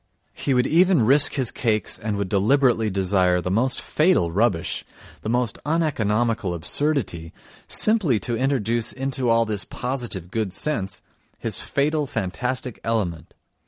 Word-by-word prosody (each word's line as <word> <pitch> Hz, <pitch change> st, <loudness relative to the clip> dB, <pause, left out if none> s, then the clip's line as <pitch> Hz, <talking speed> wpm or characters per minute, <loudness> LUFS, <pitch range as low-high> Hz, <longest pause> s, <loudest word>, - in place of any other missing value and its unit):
He 135 Hz, -, -1 dB
would 125 Hz, -, +3 dB
even 170 Hz, -, +4 dB
risk 145 Hz, +4 st, +6 dB
his 130 Hz, -4 st, 0 dB
cakes 110 Hz, -3 st, -1 dB
and 110 Hz, -2 st, -3 dB
would 100 Hz, -1 st, -2 dB
deliberately 110 Hz, +3 st, +2 dB
desire 95 Hz, -2 st, +2 dB
the 90 Hz, +1 st, -3 dB
most 125 Hz, +6 st, +1 dB
fatal 155 Hz, -, +2 dB
rubbish, 95 Hz, -2 st, 0 dB, 0.4 s
the 110 Hz, -, -4 dB
most 120 Hz, -2 st, 0 dB
uneconomical 115 Hz, -, 0 dB
absurdity, 90 Hz, -, -2 dB, 0.3 s
simply 195 Hz, -, +2 dB
to 120 Hz, -, -2 dB
introduce 120 Hz, -3 st, 0 dB
into 135 Hz, -2 st, -1 dB
all 115 Hz, 0 st, +3 dB
this 105 Hz, -2 st, -1 dB
positive 120 Hz, -9 st, -4 dB
good 110 Hz, -5 st, -2 dB
sense 100 Hz, -11 st, -3 dB, 0.3 s
his -, -, -2 dB
fatal 150 Hz, +1 st, 0 dB
fantastic 125 Hz, +4 st, -3 dB
element. 100 Hz, -8 st, -2 dB
115 Hz, 135 wpm, -23 LUFS, 100-135 Hz, 0.4 s, risk